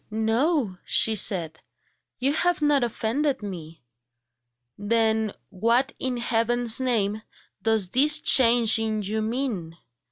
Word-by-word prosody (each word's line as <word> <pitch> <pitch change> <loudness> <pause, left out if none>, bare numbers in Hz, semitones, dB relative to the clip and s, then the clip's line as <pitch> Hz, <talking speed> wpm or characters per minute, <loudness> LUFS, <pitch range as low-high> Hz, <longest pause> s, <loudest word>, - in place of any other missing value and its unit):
"No," 225 - -1
she 225 - +4
said, 165 -6 +1 0.6
"you 270 +3 0
have 355 +3 0
not 295 -3 +1
offended 240 +3 -2
me." 165 -7 -9 0.9
"Then 220 0 0 0.2
what 230 +7 0
in 255 -1 -2
Heaven's 235 0 0
name 220 -5 -1 0.4
does 220 -4 +1
this 300 +4 +3
change 235 -5 +4
in 215 -1 -3
you 215 +3 -3
mean?" 215 -8 -4
225 Hz, 115 wpm, -24 LUFS, 210-255 Hz, 0.9 s, she